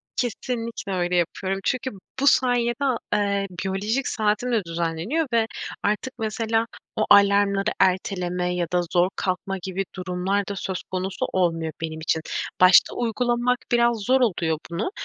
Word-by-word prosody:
Kesinlikle 230 -3 -3
öyle 180 -1 0
yapıyorum 190 +3 -1
çünkü 260 0 -1 0.3
bu 280 - +2
sayede, 245 -3 +3
a 255 -4 +2 0.2
eee, 200 -1 +1 0.2
biyolojik 205 +7 -1
saatim 215 +2 0
de 225 -4 +1
düzenleniyor 170 - -1
ve 225 -1 +3 0.4
artık, 215 +5 -1
mesela, 225 +1 0 0.3
o 215 - +1
alarmları 200 0 +5
erteleme 180 -1 +1
ya 175 -1 -1
da 180 - +3
zor 180 +1 +4
kalkma 195 +1 -2
gibi 190 +1 -2
durumlar 185 +2 -1
da 200 - -4
söz 190 -1 -4
konusu 185 +1 -2
olmuyor 165 -3 +1
benim 160 -1 -4
için. 160 0 0 0.4
Başta 185 +1 +7
uygulamak 240 +1 +1
biraz 235 -1 +3
zor 255 +6 +2
oluyor 170 -8 +1
bunu 195 - -2
200 Hz, 145 wpm, -24 LUFS, 180-230 Hz, 0.4 s, Başta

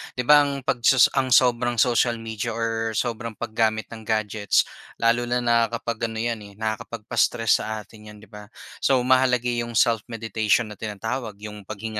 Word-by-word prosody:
'Di 125 - -2
ba 145 +2 +6
ang 140 -1 -4
pagsus 125 0 +4
ang 135 -1 0
sobrang 120 -1 +3
social 120 0 +2
media 115 0 -5
or 115 -1 -2
sobrang 115 -1 -3
paggamit 110 -1 -1
ng 110 -2 -10
gadgets 110 -2 +1 0.3
lalo 120 +1 +1
na 125 0 0
na 115 -1 +3
kapag 115 0 -3
ano 110 0 -4
'yan, 115 -1 -2
eh, 100 -1 -13
nakakapagpa-stress 110 +1 0
sa 110 -1 -5
atin 105 0 -16
'yan 105 0 -13
'di 105 - -18
ba. 105 0 -11 0.3
So 135 - +2
mahalaga 125 -1 +2
'yong 120 -1 -3
self-meditation 110 -1 +1
na 105 - -11
tinatawag 110 +1 -4
'yong 105 -1 -10
paghinga 110 0 -5
115 Hz, 170 wpm, -23 LUFS, 110-120 Hz, 0.3 s, ba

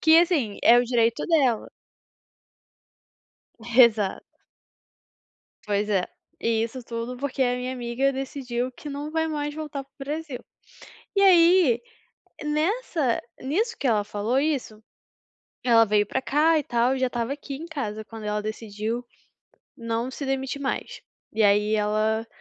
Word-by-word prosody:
que 320 +1 +7
assim, 300 - +1
é 240 +1 +7
o 245 - +3
direito 235 -1 +1
dela. 270 -9 +2 1.9
Exato. 230 -4 +3 1.4
Pois 205 0 0
é, 190 -3 +1 0.3
e 225 -1 +1
isso 240 +2 -5
tudo 235 +1 -5
porque 275 -1 -1
a 245 -1 +2
minha 250 +1 -3
amiga 255 +2 0
decidiu 255 -2 -3
que 295 - -10
não 290 +2 -5
vai 320 0 0
mais 295 -1 -3
voltar 300 -3 -5
para 275 - -40
o 275 - -9
Brasil. 295 -2 -4 0.8
E 395 - +4
aí, 345 -9 +6 0.6
nessa 305 - 0 0.2
nisso 420 - -1
que 270 - -1
ela 215 -3 +2
falou 210 +5 -1
isso, 265 -8 -2 0.8
ela 230 -2 +5
veio 210 -1 +2
pra 265 - -2
cá 310 +4 +3
e - - -1
tal, 245 +1 +1
e - - -3
já 255 -1 +1
estava 240 +2 -2
aqui 280 -1 -8
em 325 - -8
casa 220 -10 -4
quando 225 -1 -10
ela 210 0 -1
decidiu 215 +2 -4 0.7
não 230 +1 -2
se 280 - -6
demitir 270 +1 -2
mais. 270 - -3 0.3
E 220 0 +1
aí, 210 +1 +4
ela 215 +1 +1
250 Hz, 145 wpm, -25 LUFS, 225-290 Hz, 1.9 s, que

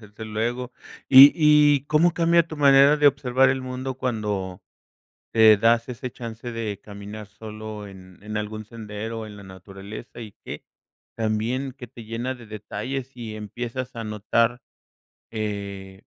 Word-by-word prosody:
Desde 105 +1 -11
luego, 120 +4 -3 0.4
y 135 +2 +10
y 150 -3 +5
¿cómo 165 +3 +3
cambia 170 0 +3
tu 155 - -8
manera 140 +1 +6
de 150 -1 +3
observar 135 -1 +3
el 130 0 0
mundo 130 +1 -5
cuando 105 -7 -3 0.7
te 110 -1 +7
das 115 +3 +2
ese 125 0 -6
chance 115 0 -8
de 110 -4 -4
caminar 105 0 -9
solo 110 -1 -8
en 95 -2 -14
en 105 +1 -6
algún 110 0 -4
sendero 110 0 -7
o 110 - -6
en 105 -1 -11
la 100 - -12
naturaleza? 95 +5 -10
Y 110 -3 -9
que - - -8 0.5
también 115 +5 -1
que 130 -2 -10
te 115 -1 -12
llena 120 +4 -4
de 120 -3 -13
detalles 120 +5 -6
y 110 -3 -7
empiezas 120 +4 -6
a 115 - -5
notar, 115 +3 0 0.7
eh, 100 -3 -5
115 Hz, 150 wpm, -24 LUFS, 105-130 Hz, 0.7 s, y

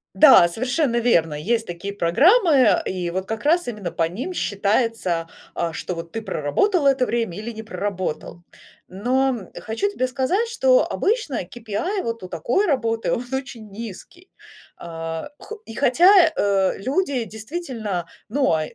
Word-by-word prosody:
Да, 270 - +8
совершенно 250 - -1
верно, 170 -10 +2
есть 225 +9 -1
такие 175 +3 -6
программы, 275 - +4
и 180 -2 -3
вот 190 +2 -3
как 225 -1 -4
раз 335 +4 +2
именно 210 -6 -4
по 165 - 0
ним 250 - -5
считается, 200 - 0 0.3
а, 170 - -2
что 180 - -5
вот 165 -1 -7
ты 225 - -5
проработал 280 - +1
это 270 -2 +3
время 230 -8 -2
или 215 +3 -5
не 220 -1 -8
проработал. 185 -5 -4 0.5
Но, 250 +8 +1
м, 230 -8 -4
хочу 225 - -2
тебе 255 -10 -1
сказать, 280 - 0
что - - +3
обычно 420 - -1
KPI 230 - -3
вот 230 - -4
у - - -6
такой 185 - 0
работы 230 - 0
он 240 - -2
очень 265 -5 -5
низкий. 230 - -10 0.5
А, 165 - -6
хо 440 0 -10
и 225 - -9
хотя, 285 +8 +4 0.3
э, 195 -2 +1
люди 270 - -1
действительно, 220 - -5 0.2
ну 270 +5 +1
он 160 -10 +2
225 Hz, 155 wpm, -22 LUFS, 185-275 Hz, 0.5 s, Да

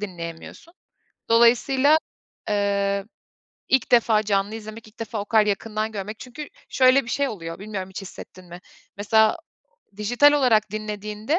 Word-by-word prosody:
dinleyemiyorsun. 175 - -8 0.6
Dolayısıyla, 255 +5 +4 0.5
eee, 200 -1 0 0.6
ilk 265 -1 +1
defa 225 -3 +4
canlı 200 0 -1
izlemek, 220 0 -9
ilk 215 - -24
defa 225 -1 -4
o - - -4
kadar 215 0 +3
yakından 215 +1 -2
görmek 210 +1 -6
çünkü 285 +4 -9 0.2
şöyle 260 +1 +4
bir 230 - -7
şey 280 +2 0
oluyor, 165 -6 -7
bilmiyorum 195 -2 -6
hiç 190 - -7
hissettin 185 -1 -12
mi? 175 0 -11 0.4
Mesela 215 +2 +3 0.6
dijital 245 +8 +4
olarak 225 -7 +2
dinlediğinde 215 - -3
215 Hz, 135 wpm, -23 LUFS, 200-235 Hz, 0.6 s, Dolayısıyla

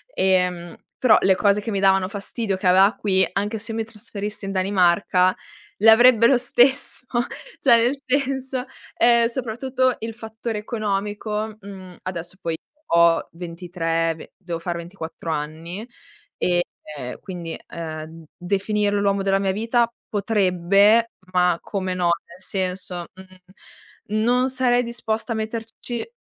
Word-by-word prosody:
Ehm, 180 -2 +1 0.2
però 250 -4 +6
le 190 0 +4
cose 200 +1 +3
che 215 +2 -4
mi 200 - -1
davano 190 -1 +3
fastidio 200 +1 -3
che 190 0 -2
ava 190 +4 +5
qui, 190 -2 +2
anche 205 +3 -1
se 225 +1 -6
mi 225 - -1
trasferissi 210 -1 -6
in 195 - -3
Danimarca, 185 -1 +3 0.4
le 225 +2 +6
avrebbe 230 0 +7
lo 260 - +5
stesso, 255 +2 +2 0.5
cioè, 240 -4 +6
nel 240 +4 +2
senso, 265 -1 -1 0.3
ehm, 235 0 +5
soprattutto 255 +2 -1
il 225 0 -5
fattore 220 -1 -5
economico, 210 0 -3
mhmm, 190 -3 -10
adesso 180 0 -6
poi 165 -3 -2 0.4
ho 170 -1 +4
23, 165 -1 -2
ve 160 - -13
devo 175 -3 -5
fare 170 0 -3
24 170 -1 -7
anni 160 +7 -5 0.5
e, 175 -1 +2 0.3
ehm, 125 -3 -6
quindi, 175 -3 -6
ehm, 160 0 -7
definirlo 205 +2 0
l'uomo 200 -1 +1
della 195 0 +2
mia 195 -1 +1
vita 230 +3 +1 0.2
potrebbe, 200 +2 +3 0.2
ma 180 -1 +3
come 185 -2 -3
no, 175 -1 +2 0.2
nel 170 +2 -14
senso, 185 -2 -3
mhmm, 190 +3 -10
non 250 +2 +3
sarei 250 -1 +2
disposta 235 -1 -3
a - - -4
metterci 225 +2 -5
200 Hz, 135 wpm, -22 LUFS, 180-225 Hz, 0.5 s, avrebbe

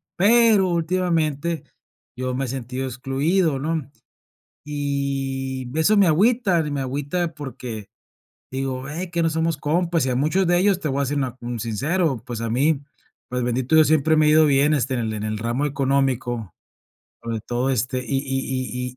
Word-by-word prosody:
pero 215 -1 +5
últimamente 165 -3 0 0.5
yo 130 0 -3
me 135 +1 -1
he - - -5
sentido 130 +1 -4
excluido, 135 +6 0
¿no? 155 0 -2 0.7
Y 135 -2 -2
b 155 - -3
eso 215 +6 +4
me 200 - +6
agüita, 195 +2 +3
y - - -3
me 145 -2 -2
agüita 145 +6 -2
porque, 125 -7 -7 0.6
digo: 130 -1 -3
"Ve, 165 +6 -5
que 170 -1 +1
no 165 - +2
somos 160 0 0
compas", 165 0 0
y - - 0
a 125 - 0
muchos 155 +8 +2
de 175 - +4
ellos 190 0 +2
te 155 - -2
voy 140 +1 0
a - - 0
ser 145 +2 -1
una 130 -3 -2
un 120 -1 -4
sincero, 135 - 0
pues 120 -3 -5
a 115 -1 -2
mí, 140 +5 +2 0.5
pues 125 -1 -2
bendito 125 +5 +1
Dios 155 -1 +7
siempre 155 0 +3
me 155 - +4
ha 150 - +5
ido 155 0 +6
bien, 145 +1 +3
este, 135 -1 0
en 125 - -1
el 110 -1 -2
en 105 -1 -4
el 110 0 -2
ramo 120 +6 -1
económico, 130 - 0 0.7
sobre 115 -1 -3
todo 120 +4 -1
este, 125 +1 0
y 135 - 0
y 130 -2 -3
140 Hz, 185 wpm, -23 LUFS, 130-160 Hz, 0.7 s, Dios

